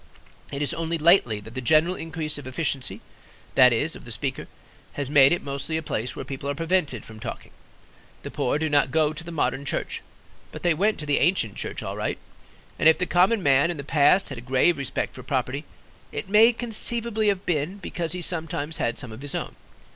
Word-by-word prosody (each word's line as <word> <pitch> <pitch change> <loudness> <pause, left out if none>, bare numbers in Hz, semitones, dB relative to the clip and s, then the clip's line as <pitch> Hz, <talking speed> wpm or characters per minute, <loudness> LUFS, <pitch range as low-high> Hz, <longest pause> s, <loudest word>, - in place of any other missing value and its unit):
It 140 +1 -2
is 145 - -1
only 165 0 -2
lately 155 - +4
that 110 +2 -12
the 130 - -4
general 155 +7 +3
increase 160 -3 -2
of 135 - -9
efficiency, 135 -1 -2 0.5
that 125 -1 +7
is, 150 +8 +1
of - - -11
the 120 - -9
Speaker, 130 +3 -3 0.5
has 140 -1 -4
made 140 -2 +7
it 175 - 0
mostly 140 +3 -3
a 160 - -4
place 120 -4 -3
where - - -6
people 140 +1 -5
are 140 - -1
prevented 165 - 0
from 110 -1 -12
talking. - - -7 0.7
The - - -6
poor 125 - 0
do 160 +1 0
not 145 -2 +3
go 155 +2 +2
to 155 +2 -8
the 170 - -8
modern 135 -4 -1
church, 140 - -3 0.5
but - - -9
they 175 -2 +4
went 205 +7 +1
to - - -5
the 145 -1 +2
ancient 155 - +2
church - - -5
all - - -4
right; - - -2 0.6
and 160 - +7
if 160 - +4
the 180 - 0
common 185 +4 +3
man 140 +3 +4
in 175 - -3
the 140 - -6
past 150 +6 +3
had 135 -4 -6
a - - -10
grave 130 +6 +2
respect 140 - -3
for 130 - -9
property, 130 +2 -2 0.5
it - - -5
may 215 +4 +6
conceivably 230 -1 -2
have 200 -2 +1
been 165 +3 -1
because 170 -4 -4
he 180 -1 -4
sometimes 160 -2 -2
had 115 - -1
some 125 -5 -6
of 110 +3 -9
his 145 -1 -3
own. - - -4
150 Hz, 215 wpm, -25 LUFS, 135-175 Hz, 0.7 s, that